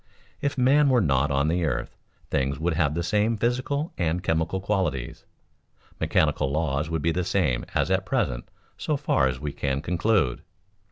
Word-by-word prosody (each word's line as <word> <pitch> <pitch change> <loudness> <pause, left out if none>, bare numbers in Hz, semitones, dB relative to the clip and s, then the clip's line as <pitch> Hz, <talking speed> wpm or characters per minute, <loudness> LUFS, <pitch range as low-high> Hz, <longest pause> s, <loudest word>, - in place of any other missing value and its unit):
If 140 0 -1
man 140 +3 +4
were 130 -2 +4
not 70 - +2
on 70 +1 +1
the 85 +2 +1
earth, 75 -6 -2 0.4
things 70 +1 0
would 85 +1 0
have 80 -2 +1
the 85 - -1
same 105 +5 +1
physical 130 +7 -1
and 85 +1 0
chemical 80 +2 0
qualities, 95 -11 -2 0.7
mechanical 70 - +1
laws 75 0 -1
would 80 -2 -2
be 85 - +2
the 90 +2 -1
same 85 -10 0
as - - +1
at - - +2
present - - -1 0.3
so 150 - 0
far 70 - +2
as 65 -1 -3
we 75 -1 -4
can 70 -1 -1
conclude. 85 - +1
85 Hz, 170 wpm, -25 LUFS, 70-105 Hz, 0.7 s, man